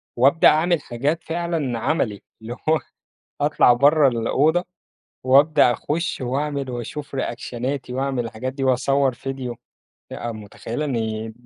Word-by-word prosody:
وأبدأ 135 +7 +5
أعمل 165 +2 +3
حاجات 140 +7 -2
فعلًا 160 -8 -2
عملي، 110 -8 -1 0.2
اللي 115 +2 -6 0.2
هو 160 0 +4 0.6
أطلع 120 - +5
برّة 145 +3 +5
الأوضة، 140 +8 +2 0.6
وأبدأ 140 0 +5
أخش 160 +3 -3
وأعمل 140 +2 -2
وأشوف 135 +4 -6
reactionاتي 125 +2 -4
وأعمل 130 -2 -1
الحاجات 115 +3 -5
دي 135 -1 -4
وأصور 135 +1 +2
فيديو. 130 -1 -5 0.6
آآ، 120 -1 -4
متخيلة 110 +6 -6
إن 110 -4 -3
135 Hz, 120 wpm, -22 LUFS, 120-150 Hz, 0.6 s, وأبدأ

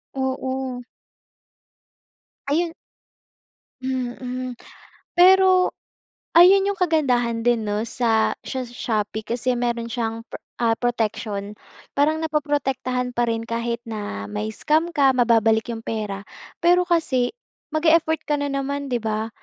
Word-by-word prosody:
Oo. 260 -1 -3 1.6
Ayun. 330 +3 0 1.1
Mm, 255 -1 -3 0.6
pero 370 0 +6 0.6
ayun 385 +3 +7
'yung 400 -1 -1
kagandahan 245 -9 +1
din, 240 -2 +3
no, 210 +2 -1
sa 225 -2 +1
sha 260 -2 -4
Shopee 220 -3 -2
kasi 245 +2 -1
meron 240 -1 -1
siyang, 230 -1 -3
pra - - -9 0.2
ah, 230 -1 +2
protection. 215 -3 -2 0.4
Parang 300 +3 +2
naproprotektahan 270 -5 -1
pa 240 -1 +1
rin 230 0 -2
kahit 235 0 -2
na 205 - -5
mai-scam 110 - -1
ka, 275 -5 +3
mababalik 225 -2 +3
'yung 225 -1 -5
pera. 205 -3 -4 0.3
Pero 355 +1 +4
kasi 320 -8 +1 0.4
mag-e-effort 320 0 +2
ka 295 -1 0
na 285 - -1
naman, 275 0 -3
di 245 - +1
ba? 220 0 -2
250 Hz, 115 wpm, -23 LUFS, 230-295 Hz, 1.6 s, ayun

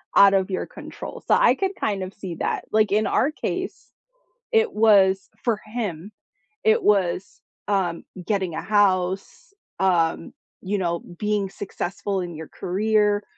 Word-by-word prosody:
out 200 0 +7
of 190 0 +1
your 185 - -2
control, - - -9
so, - - +4
I - - +5
can 385 0 -1
kind 200 -3 -1
of 185 - -7
see 185 -4 -7
that. - - -2
Like 215 -2 +3
in 215 +1 +2
our 285 - +2
case, - - -4 0.7
it 450 -1 +3
was 195 - +4
for 225 -3 0
him, 210 -5 -4 0.5
it 445 +1 +4
was, 190 - +1 0.3
um, 190 -5 0 0.2
getting 190 -6 -1
a - - -3
house, 195 - 0 0.3
um, 170 -4 +1 0.3
you 200 +2 -1
know, 170 -2 -1 0.2
being 210 -2 0
successful 200 0 -3
in 175 -1 -5
your 160 0 -8
career, 210 +2 +1
200 Hz, 150 wpm, -23 LUFS, 185-215 Hz, 0.7 s, out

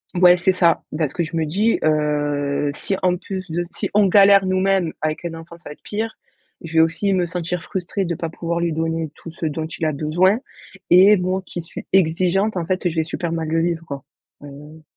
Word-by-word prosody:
Ouais. 180 0 +6
C'est 180 +2 +2
ça, 170 -2 +2
parce 155 -4 -1
que 175 - -2
je 165 +1 -4
me 160 - 0
dis, 205 +9 +1
heu: 145 -2 0
«Si 195 - -3
en 180 -1 +3
plus 185 -1 -7
de 175 +2 -1
si - - -3
on 205 -1 +4
galère 195 0 +6
nous-mêmes, 185 -2 +1
avec 155 +2 -2
un 165 - -3
enfant 165 +1 -11
ça 170 - -12
va - - -7
être - - -26
pire. 220 +1 -4 0.4
Je 165 -1 -9
vais 160 - +4
aussi 190 +5 +1
me 180 -2 +1
sentir 175 0 -3
frustrée 190 +2 -3
de 170 -1 -2
pas 165 - -4
pouvoir 170 +1 -3
lui 170 -2 0
donner 165 0 -2
tout 165 - -10
ce 165 - -6
dont 155 +1 -2
il 160 0 -4
a 155 - 0
besoin 175 - +2 0.5
et 190 +4 +7
moi 185 +1 -1
qui 175 - -5
suis 165 - -9
exigeante, 185 +3 +2
en 170 - -2
fait, 185 0 0
je 165 - -7
vais 160 - +1
super 165 +1 -4
mal 165 -1 -2
le 165 0 +1
vivre, 165 -1 -2
quoi». 140 -3 -7 0.4
Heu 150 +2 -12
170 Hz, 225 wpm, -21 LUFS, 160-185 Hz, 0.5 s, et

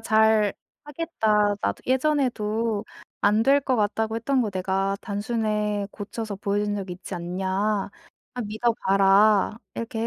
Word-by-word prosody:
"잘 220 -2 +3 0.3
하겠다. 220 -10 +1
나도 - - -2
예전에도 235 -6 0 0.4
안 210 +2 +3
될 275 +4 +4
거 260 -2 0
같다고 220 +1 0
했던 260 +4 +1
거 220 -4 0
내가 190 +1 -1
단숨에 210 -1 -1
고쳐서 210 0 -6
보여준 205 +1 -1
적이 190 -3 -4
있지 185 +1 -8
않냐. 180 +2 -4 0.9
나 250 - -4
믿어 220 +3 0
봐라." 195 +2 +4 0.2
이렇게 230 0 -3
215 Hz, 260 characters per minute, -25 LUFS, 200-230 Hz, 0.9 s, 될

